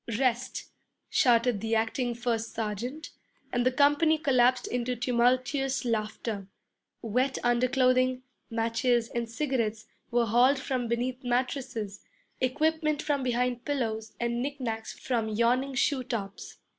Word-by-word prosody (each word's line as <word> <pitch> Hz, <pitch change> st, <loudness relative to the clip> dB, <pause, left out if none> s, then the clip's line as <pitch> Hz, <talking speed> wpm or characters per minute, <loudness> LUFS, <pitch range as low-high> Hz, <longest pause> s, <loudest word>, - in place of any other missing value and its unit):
'Rest,' 255 Hz, -1 st, -1 dB, 0.4 s
shouted 235 Hz, -3 st, +3 dB
the 225 Hz, 0 st, 0 dB
acting 235 Hz, +2 st, 0 dB
first 230 Hz, -1 st, -2 dB
sergeant, 230 Hz, +8 st, -4 dB, 0.4 s
and 245 Hz, -1 st, +2 dB
the 255 Hz, -, +3 dB
company 290 Hz, +4 st, +4 dB
collapsed 255 Hz, -4 st, +3 dB
into 245 Hz, 0 st, -2 dB
tumultuous 255 Hz, +3 st, +1 dB
laughter. 215 Hz, -3 st, -2 dB, 0.6 s
Wet 250 Hz, +4 st, 0 dB
under 240 Hz, +1 st, +3 dB
clothing, 255 Hz, 0 st, +2 dB, 0.3 s
matches, 230 Hz, +1 st, +1 dB
and 235 Hz, -1 st, -3 dB
cigarettes, 230 Hz, -5 st, -1 dB, 0.2 s
were 240 Hz, -1 st, +2 dB
hauled 245 Hz, +5 st, +4 dB
from 255 Hz, -2 st, -2 dB
beneath 245 Hz, +2 st, -2 dB
mattresses, 245 Hz, -4 st, -2 dB, 0.4 s
equipment 305 Hz, +3 st, +1 dB
from 290 Hz, -2 st, 0 dB
behind 245 Hz, -1 st, 0 dB
pillows, 225 Hz, -6 st, -2 dB
and 235 Hz, 0 st, -1 dB
knick 280 Hz, +2 st, -3 dB
knacks 225 Hz, -3 st, -3 dB
from 230 Hz, -4 st, -2 dB
yawning 245 Hz, +5 st, +1 dB
shoe 260 Hz, +1 st, +1 dB
tops. 205 Hz, -5 st, -5 dB
245 Hz, 125 wpm, -28 LUFS, 230-260 Hz, 0.6 s, company